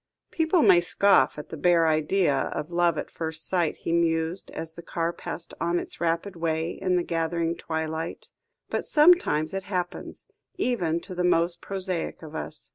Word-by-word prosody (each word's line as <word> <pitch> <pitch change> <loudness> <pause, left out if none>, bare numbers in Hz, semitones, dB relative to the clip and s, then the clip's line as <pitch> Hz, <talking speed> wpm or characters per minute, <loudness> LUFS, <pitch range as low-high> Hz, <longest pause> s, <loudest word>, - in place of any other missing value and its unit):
"People 325 0 +2
may 175 - +6
scoff 195 +1 +3
at 150 - -8
the - - -6
bare 170 +1 +4
idea 155 +2 +2
of 150 +4 -3
love 170 -2 +2
at - - -5
first 160 -1 -4
sight," 175 -4 0
he - - -4
mused, 165 +1 +1
as 160 0 -7
the 170 - -10
car 170 0 -2
passed 170 - -7
on 170 +1 +1
its - - -6
rapid 170 +3 -1
way 165 0 -1
in 185 -1 -1
the 175 - +2
gathering 165 0 -1
twilight, 160 - -4 0.4
"but - - -2
sometimes 300 - +4
it 195 0 -3
happens 180 -3 -4 0.3
even 185 - 0
to 185 - -8
the 180 0 -1
most 175 -1 +2
prosaic 185 -4 -3
of 155 -1 -10
us." 155 -1 -5
170 Hz, 175 wpm, -26 LUFS, 160-185 Hz, 0.4 s, may